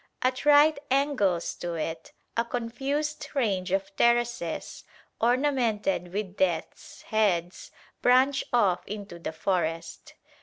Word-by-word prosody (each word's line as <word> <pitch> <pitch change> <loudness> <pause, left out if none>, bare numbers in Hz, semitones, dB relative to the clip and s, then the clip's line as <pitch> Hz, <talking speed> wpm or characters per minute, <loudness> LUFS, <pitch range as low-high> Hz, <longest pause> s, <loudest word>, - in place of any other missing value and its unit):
At 255 +2 0
right 295 +1 +6
angles 255 -11 +1
to 175 -1 -4
it, 160 0 -4 0.2
a 230 - +2
confused 275 +6 -3
range 195 -8 0
of 195 0 -1
terraces, 235 -8 0 0.4
ornamented 230 -7 +1
with 195 -1 -4
death's 175 -4 -2
heads, 185 -5 0 0.3
branch 260 +3 +4
off 190 -7 +2
into 200 -4 -7
the 165 - -4
forest. 165 -1 -3
215 Hz, 110 wpm, -27 LUFS, 180-255 Hz, 0.4 s, right